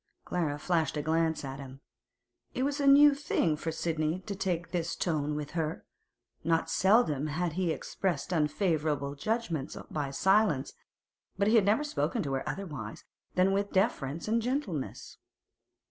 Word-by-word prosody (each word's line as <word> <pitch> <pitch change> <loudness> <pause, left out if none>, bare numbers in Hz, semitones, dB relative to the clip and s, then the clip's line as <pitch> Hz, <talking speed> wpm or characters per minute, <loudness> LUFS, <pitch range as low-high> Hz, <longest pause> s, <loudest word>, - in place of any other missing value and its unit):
Clara 160 -5 -1
flashed 160 -1 0
a 150 - -1
glance 160 -1 +1
at 135 0 -6
him. 135 -1 -9 0.8
It 255 - 0
was 285 +1 -1
a 280 - +2
new 285 +1 +8
thing 275 - 0
for 160 +2 -3
Sidney 160 +1 -1
to 200 +1 -5
take 180 -3 -2
this 170 -2 -1
tone 150 -3 -1
with 150 -1 -4
her; 160 -1 -3 0.6
not 165 0 +1
seldom 165 - +3
he 150 - -4
had 175 -2 -1
expressed 175 -1 -1
unfavourable 150 -3 0
judgments 170 - -2
by 145 -3 -2
silence, 190 -1 +2 0.6
but 200 +1 +2
he - - +3
had 220 -4 +5
never 215 +8 +3
spoken 290 -5 -1
to 140 -3 -3
her 135 - -2
otherwise 145 - -6 0.3
than 185 +1 +4
with 200 +1 0
deference 165 - 0
and 230 +2 +2
gentleness. 230 - -3
165 Hz, 155 wpm, -30 LUFS, 150-200 Hz, 0.8 s, new